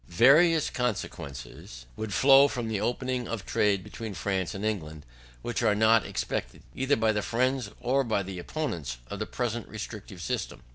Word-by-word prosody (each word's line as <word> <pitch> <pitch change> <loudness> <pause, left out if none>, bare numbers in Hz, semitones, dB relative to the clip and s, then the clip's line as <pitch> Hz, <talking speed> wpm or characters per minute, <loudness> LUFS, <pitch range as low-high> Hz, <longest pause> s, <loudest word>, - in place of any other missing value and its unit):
Various 155 - +5
consequences 70 - -5
would 110 -1 -5
flow 135 +5 +7
from 120 -4 -3
opening 125 +4 -1
the 115 - -3
trade 100 -1 +1
between 110 0 -7
France 95 +1 -2
and 100 +2 -4
England, 80 -8 -3 0.4
which 120 -2 -2
are 110 -3 +3
not 110 +1 +4
expected, - - -4
either 135 +2 +1
by 110 0 +2
the 105 -1 0
friends 125 0 0
or 130 +3 +2
by 110 -5 0
the 95 -1 -6
opponents 85 - -4
of - - -4
the - - -3
present - - -3
restrictive - - -8
system. - - -4
110 Hz, 160 wpm, -28 LUFS, 95-130 Hz, 0.4 s, flow